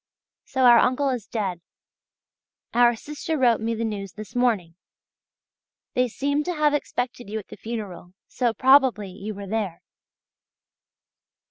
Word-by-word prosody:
So 260 -1 -1
our 240 -1 +8
uncle 270 +2 +2
is 245 -6 -3
dead! 190 -6 -3 1.1
Our 240 0 +5
sister 300 +6 -4
wrote 240 -5 +3
me 230 +1 -1
the 230 +1 -2
news 200 -3 -5
this 215 0 -10
morning. 220 -9 +1 1.2
They 250 0 +2
seem 285 +5 -1
to 355 - -2
have 300 -1 +2
expected 245 -5 -3
you 215 - -3
at 210 - -8
the - - -9
funeral, 205 -6 -7
so 245 -2 0
probably 255 -4 +4
you 200 +3 -7
were 200 0 -7
there. 200 -4 -3
230 Hz, 140 wpm, -24 LUFS, 205-255 Hz, 1.2 s, our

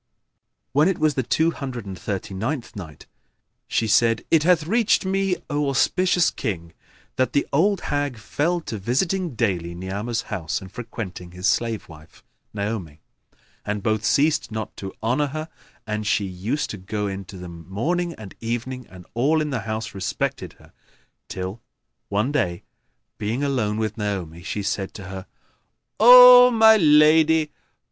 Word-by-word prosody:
When 150 +4 +3
it 190 - 0
was 155 -1 +2
the 130 - 0
Two 160 +7 +1
Hundred 130 -8 -6
and 95 -1 -6
Thirty 95 +1 -5
ninth 115 +5 -4
Night, 80 -7 -9 0.6
She 115 - 0
said, 115 +1 +3
It 165 - +5
hath 170 -1 +3
reached 220 +2 +2
me, 195 -1 0
O 145 -2 -1
auspicious 180 +6 +2
King, 85 -6 -5 0.4
that 130 - +1
the 145 - +2
old 190 +6 +2
hag 145 -4 -2
fell 165 +10 -1
to 110 -9 -6
visiting 165 - -1
daily 90 -7 -1
Ni'amah's 100 +6 -3
house 80 -3 -2
and 95 -1 -12
frequenting 95 -6 -7
his 90 +1 -6
slave 115 -1 0
wife, 80 0 -16 0.3
Naomi; 100 -7 -4 0.6
and 105 -1 -3
both 110 -1 0
ceased 150 +1 +2
not 110 0 -5
to 95 -1 -6
honour 130 +6 +1
her, 155 +3 -6 0.4
and 105 -1 -3
she 105 -2 +1
used 95 +10 -3
to 105 - -6
go 105 +2 -4
in 95 -1 -4
to 100 -1 -11
them 85 -2 -10
morning 170 - -1
and 105 -3 -11
evening 120 +2 -4
and 90 -1 -14
all 140 +7 +2
in 150 -1 -2
the 130 - -1
house 110 0 -4
respected 95 -2 -3
her - - -21 0.5
till, 95 +4 -6 0.5
one 105 +7 0
day, 90 -12 -1 0.6
being 115 +6 -2
alone 120 -7 0
with 110 0 -3
Naomi, 95 -6 -4
she 100 +3 -4
said 100 -1 -3
to 95 -3 -9
her, 95 -1 -8 0.7
"O 250 +2 +10
my 220 -2 +6
lady! 155 -2 +5
115 Hz, 160 wpm, -23 LUFS, 95-150 Hz, 0.7 s, O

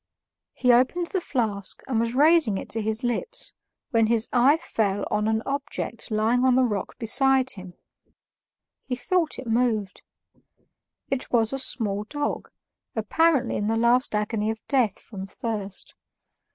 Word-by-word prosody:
He 250 -1 +3
opened 260 +9 +2
the 375 - 0
flask 215 - -3
and 245 -4 0
was 230 +1 -1
raising 300 - +4
it - - -7
to 225 - -1
his 220 +2 0
lips, 450 - -2 0.4
when 225 -3 +3
his 230 0 +4
eye 260 +5 +5
fell 205 -9 -1
on 210 0 +1
an 220 +1 0
object 280 -4 -3
lying 225 +3 +1
on 260 -1 +4
the 260 - +4
rock 210 -5 -2
beside 265 +2 +3
him; 185 -2 -7 1.1
he 250 - -1
thought 340 +4 0
it 260 - -7
moved. 225 -4 0 1.1
It 270 -2 -2
was 225 0 +2
a 270 - -2
small 210 -6 0
dog, 290 +5 -3 0.5
apparently 280 +6 +2
in 205 - -2
the 225 +1 +1
last 235 0 +2
agony 210 0 -1
of 220 0 -3
death 250 -8 +1
from 195 -3 -9
thirst. 205 -4 -4
235 Hz, 150 wpm, -25 LUFS, 215-265 Hz, 1.1 s, eye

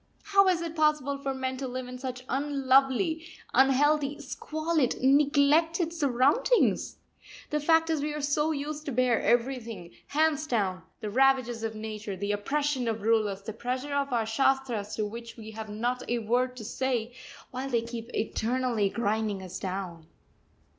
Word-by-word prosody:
How 395 -1 +4
is 350 -2 +2
it 335 -1 -5
possible 300 -3 +1
for 275 -1 -2
men 260 -1 -3
to 265 0 -4
live 255 0 -5
in 250 0 -8
such 255 -1 -5
unlovely, 275 +3 +2 0.3
unhealthy, 280 +2 +3
squalid, 310 -1 -1
neglected 295 +5 +3
surroundings? 290 - +2 0.5
The 300 - +1
fact 325 +2 +3
is 310 -3 0
we 300 +1 -1
are - - -3
so 295 +2 +1
used 300 +1 -4
to - - -1
bear 250 -1 +2
everything, 230 -7 -1 0.2
hands 310 0 +1
down, 195 - 0 0.2
the 210 - -4
ravages 260 -2 +3
of 225 -1 -3
Nature, 215 -2 -5
the 200 +2 -2
oppression 270 +5 -1
of 220 -2 -2
rulers, 215 -3 +1
the 220 +1 -5
pressure 255 +5 -3
of 280 -1 0
our 230 -2 +1
shastras 235 -2 0
to 215 - -1
which 230 +3 -8
we 220 -1 -9
have 220 0 -7
not 240 +4 -2
a 240 - +1
word 250 +3 0
to 220 - -7
say, 245 -1 -2 0.4
while 260 +2 -4
they 235 -3 +1
keep 230 0 -7
eternally 230 -1 0
grinding 215 -3 -1
us 185 - -7
down. 180 -4 -5
255 Hz, 160 wpm, -28 LUFS, 225-290 Hz, 0.5 s, How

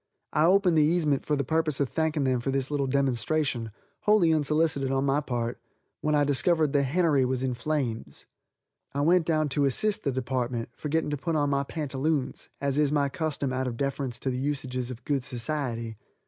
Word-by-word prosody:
I 155 - +4
opened 180 -2 +4
the 150 - +5
casement 155 -5 +1
for 150 - +2
the 140 - 0
purpose 155 0 0
of 140 - +2
thanking 160 0 0
them 130 -2 +1
for 120 - -3
this 135 +1 -1
little 140 -2 0
demonstration, 135 -2 0 0.3
wholly 210 -6 +4
unsolicited 150 -2 +1
on 135 +1 +1
my 140 +1 +2
part, 120 -4 -3 0.4
when 150 0 +1
I 145 - +4
discovered 150 +2 +2
the 145 - +4
hennery 145 0 +2
was 130 0 -1
in 130 -1 0
flames. 120 - -3 0.7
I 140 - +1
went 170 +2 +3
down 155 -2 +2
to 140 +1 +1
assist 210 - +1
the 140 - +1
department, 125 -2 -2
forgetting 150 +3 -2
to 145 - -1
put 165 +4 -2
on 145 -2 +1
my 140 0 +2
pantaloons 140 -1 -2
as 140 0 0
is 145 -2 +3
my 145 -2 +2
custom 140 -3 -2
out 130 0 -1
of 120 -2 -4
deference 135 -2 -2
to 130 - -1
the 125 - -3
usages 130 -3 -2
of 125 -1 -9
good 140 -3 0
society. 120 -3 -3
140 Hz, 195 wpm, -27 LUFS, 130-155 Hz, 0.7 s, the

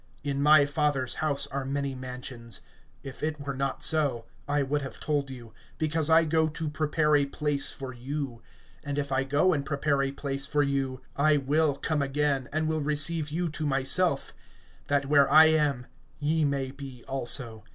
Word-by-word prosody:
(2)In 140 -1 -1
my 150 0 +6
Father's 145 -3 0
house 140 -3 0
are 140 0 -2
many 140 0 -2
mansions; 125 -3 -6 0.4
if 135 -1 -9
it 155 -1 -2
were 140 -1 -4
not 135 +1 -3
so, 140 -7 +2 0.2
I 145 0 +1
would 145 +2 -1
have 135 - -7
told 145 -2 -1
you; 120 -4 -10 0.2
because 155 0 +1
I 160 0 +6
go 160 0 +2
to 155 0 -4
prepare 150 +1 +1
a 140 -1 +3
place 145 0 0
for 135 -2 -7
you. 130 -1 -5 0.4
(3)And 145 -1 -4
if 140 -1 -2
I 135 0 +1
go 145 +7 +2
and 145 -3 -1
prepare 140 0 0
a 135 - 0
place 140 0 -4
for 150 -1 +2
you, 135 -2 -2
I 150 +1 +3
will 145 +1 +1
come 150 +1 -1
again, 140 -1 0
and 155 +1 0
will 155 0 -1
receive 150 +1 0
you 170 +4 -1
to 155 +1 -5
myself; 140 +3 +1 0.5
that 140 -1 +1
where 140 -1 +4
I 155 +1 +9
am 145 -5 +1 0.3
ye 155 +1 +1
may 135 -2 -1
be 135 -3 -10
also. 120 -4 0
140 Hz, 185 wpm, -28 LUFS, 135-150 Hz, 0.5 s, I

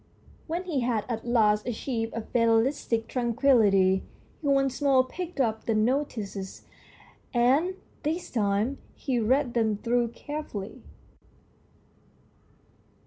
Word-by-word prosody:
When 340 +3 -2
he 335 -7 -1
had 235 -4 0
at 235 -1 -4
last 215 -3 +3
achieved 230 -1 -3
a 230 - -2
fatalistic 230 0 +1
tranquillity, 225 -7 +3 0.4
he 295 - -3
once 275 -1 +2
more 270 -2 +5
picked 355 +2 -6
up 220 -4 0
the 225 - +2
notices, 215 -5 -2 0.7
and 275 +10 +3 0.3
this 320 +3 -3
time 215 +4 0 0.2
he 255 -3 -1
read 250 +3 +1
them 220 -3 +1
through 240 +2 +1
carefully. 235 -5 -7
240 Hz, 110 wpm, -27 LUFS, 220-275 Hz, 0.7 s, more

